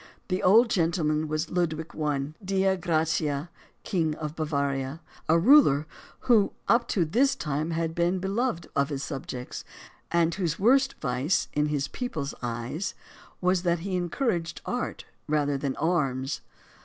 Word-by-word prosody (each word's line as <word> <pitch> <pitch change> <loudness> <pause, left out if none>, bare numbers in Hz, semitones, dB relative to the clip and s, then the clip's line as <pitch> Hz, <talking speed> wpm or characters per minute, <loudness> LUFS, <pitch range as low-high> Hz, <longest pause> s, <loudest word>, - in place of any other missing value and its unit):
The 185 0 0
old 225 +5 +6
gentleman 160 -3 +1
was 155 +2 -2
Ludwig 165 -3 -1
I. 150 -1 -1
Dei 190 0 +2
gratia, 160 -2 0 0.3
King 160 -5 0
of 155 -1 -5
Bavaria, 140 -2 -1 0.3
a 165 - +6
ruler 170 - +6 0.4
who 225 -5 +4
up 235 +1 +3
to 180 -5 +1
this 255 - +2
time 150 +1 -2
had 165 0 -1
been 175 +2 +1
beloved 195 0 -1
of 140 +1 +2
his 140 -2 -3
subjects; 130 -4 -6 0.5
and 170 0 +3
whose 170 -3 -1
worst 265 +6 +4
vice, 130 +8 0
in 150 0 +1
his 145 -1 -1
people's 155 - -4
eyes, 120 - -3 0.5
was 180 0 +2
that 170 -2 +1
he 190 +1 -2
encouraged 175 -1 -1
art 245 0 -3 0.2
rather 145 -2 +1
than 135 -1 -2
arms. 140 -5 0
165 Hz, 145 wpm, -27 LUFS, 150-185 Hz, 0.5 s, old